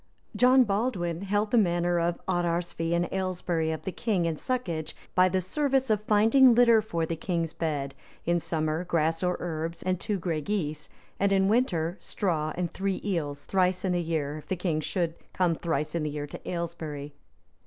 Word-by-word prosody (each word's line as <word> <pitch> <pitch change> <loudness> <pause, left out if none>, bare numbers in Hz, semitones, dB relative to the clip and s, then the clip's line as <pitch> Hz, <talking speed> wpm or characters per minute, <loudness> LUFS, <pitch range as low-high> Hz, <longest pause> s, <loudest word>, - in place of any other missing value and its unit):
[* - - -40
John 255 +1 +6
Baldwin 195 -6 -1
held 205 +2 0
the 240 - +5
manor 175 -2 +2
of 170 0 0
Oterarsfee 170 -2 0
in 170 0 +1
Aylesbury 180 -4 -1
of 160 -1 -3
the 190 - -3
king 195 -4 0
in 165 - +1
soccage, 170 -5 -3 0.2
by 185 0 +5
the 185 0 +1
service 265 - +1
of 210 -1 +2
finding 225 +4 +6
litter 235 -2 +6
for 170 -6 -2
the 165 - -3
king's 165 -1 -2
bed, 145 -4 -2
viz., 140 - -27 0.2
in 175 - +3
summer, 160 0 -1
grass 165 -2 0
or 180 -1 0
herbs, 165 0 -4
and 185 -1 0
two 205 0 -1
gray 165 -3 -2
geese, 155 -4 -3 0.3
and 200 0 +2
in 190 -1 +3
winter, 190 -7 +1
straw, 160 -6 -1
and 175 -1 -2
three 195 0 -2
eels, 150 -7 -2
thrice 185 0 +1
in 185 - +1
the 175 -1 +1
year, 155 -3 -2
if - - -15
the 190 - -1
king 170 -3 -1
should 170 +1 -1 0.2
come 180 -2 +2
thrice 160 -2 -2
in 170 - -1
the 150 - -1
year 145 0 -4
to 145 - -8
Aylesbury. 160 -4 -4
175 Hz, 195 wpm, -28 LUFS, 160-195 Hz, 0.3 s, John